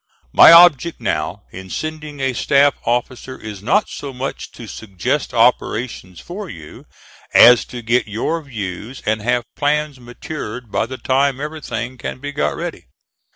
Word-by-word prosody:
My -, -, +9 dB
object 170 Hz, -2 st, +6 dB
now 85 Hz, +5 st, -3 dB
in 95 Hz, 0 st, -10 dB
sending 155 Hz, +2 st, -6 dB
a 135 Hz, -1 st, 0 dB
staff 140 Hz, +3 st, +3 dB
officer 125 Hz, +2 st, -2 dB
is 105 Hz, -3 st, -8 dB
not 200 Hz, -, +2 dB
so 140 Hz, -, -7 dB
much 130 Hz, +1 st, -6 dB
to 115 Hz, -, -10 dB
suggest 105 Hz, +6 st, -3 dB
operations 115 Hz, -5 st, 0 dB
for 190 Hz, +2 st, -8 dB
you, 75 Hz, -, -12 dB, 0.5 s
as 125 Hz, -1 st, +8 dB
to 120 Hz, -1 st, -9 dB
get 115 Hz, +1 st, +1 dB
your 115 Hz, +10 st, -2 dB
views 110 Hz, -, -7 dB
and 110 Hz, 0 st, 0 dB
have 120 Hz, +2 st, 0 dB
plans 150 Hz, -1 st, -1 dB
matured 120 Hz, -2 st, -8 dB
by 110 Hz, -, 0 dB
the 130 Hz, +1 st, -7 dB
time 135 Hz, +1 st, +1 dB
everything 130 Hz, -5 st, -5 dB
can -, -, -5 dB
be 145 Hz, +2 st, -5 dB
got 75 Hz, -, -1 dB
ready. -, -, -6 dB
125 Hz, 155 wpm, -19 LUFS, 110-145 Hz, 0.5 s, My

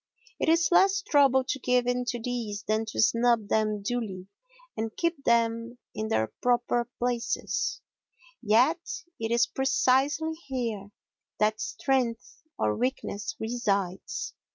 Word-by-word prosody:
It -, -, +1 dB
is 330 Hz, -1 st, +4 dB
less 385 Hz, +2 st, +4 dB
trouble 275 Hz, -7 st, +4 dB
to 270 Hz, +1 st, -3 dB
give 250 Hz, 0 st, +2 dB
in 245 Hz, 0 st, 0 dB
to 240 Hz, 0 st, -2 dB
these 225 Hz, -4 st, -4 dB
than 215 Hz, +1 st, 0 dB
to 220 Hz, -, -6 dB
snub 230 Hz, -1 st, +3 dB
them 215 Hz, -2 st, +1 dB
duly 200 Hz, -5 st, -3 dB, 0.5 s
and 220 Hz, 0 st, -4 dB
keep 335 Hz, -4 st, -1 dB
them 230 Hz, +1 st, +1 dB, 0.2 s
in 220 Hz, -, -3 dB
their 110 Hz, -, 0 dB
proper 240 Hz, 0 st, +1 dB
places, 245 Hz, -1 st, -1 dB, 0.6 s
yet 245 Hz, +9 st, +4 dB, 0.4 s
it 225 Hz, 0 st, -2 dB
is 235 Hz, +1 st, +4 dB
precisely 280 Hz, +1 st, +1 dB
here 230 Hz, -7 st, -3 dB, 0.5 s
that 215 Hz, +1 st, +1 dB
strength 250 Hz, -3 st, -1 dB, 0.2 s
or 105 Hz, 0 st, +1 dB
weakness 220 Hz, -4 st, -3 dB
resides. 200 Hz, -5 st, -2 dB
240 Hz, 130 wpm, -28 LUFS, 220-260 Hz, 0.6 s, is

